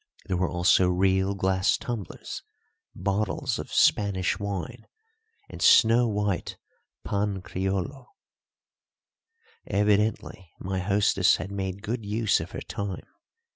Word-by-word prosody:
There 95 - -2
were 90 -1 0
also 90 +1 +3
real 95 +2 +2
glass 95 0 +1
tumblers, 110 -8 -6 0.5
bottles 100 +3 -1
of - - -7
Spanish 95 -2 +2
wine, 100 -5 -5 0.6
and - - -10
snow 120 +1 +6
white 105 -4 -2 0.5
pan 100 -2 -2
creollo. 95 +9 -3 1.6
Evidently 105 -3 0
my 95 0 -3
hostess 100 0 +3
had 95 - -6
made 95 -1 -4
good 115 +4 -3
use 105 +1 +1
of - - -6
her - - -7
time. 100 -2 -5
100 Hz, 110 wpm, -26 LUFS, 95-105 Hz, 1.6 s, snow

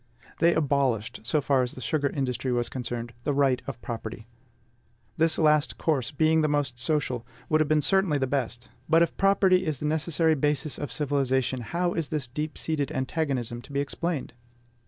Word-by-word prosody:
They 170 0 +4
abolished, 135 -7 0
so 150 +5 +2
far 135 -1 +2
as 125 -1 -2
the - - -9
sugar 140 +5 0
industry 130 -2 -2
was 120 -1 0
concerned, 120 -2 -5
the 145 - 0
right 135 -3 +3
of 130 -3 -5
property. 115 -1 -6 0.9
This 160 0 +2
last 150 -1 +3
course, 145 -7 0
being 160 +2 +3
the 155 - +2
most 145 -5 -1
social, 130 -3 0 0.3
would 155 0 +3
have 155 - +2
been 155 -1 +2
certainly 190 -5 +2
the 135 - +1
best; 125 -2 -3 0.2
but, 165 +1 +6
if 170 - -2
property 195 -2 +4
is 155 -5 -1
the 150 - -5
necessary 160 +1 +2
basis 150 0 0
of 145 - -4
civilization, 130 -3 0
how 175 +8 -1
is 165 -3 -2
this 150 -5 -2
deep 150 +5 -4
seated 150 -4 -2
antagonism 130 -4 -2
to 135 - -14
be 140 - -1
explained? 155 +1 -3
145 Hz, 180 wpm, -27 LUFS, 130-155 Hz, 0.9 s, but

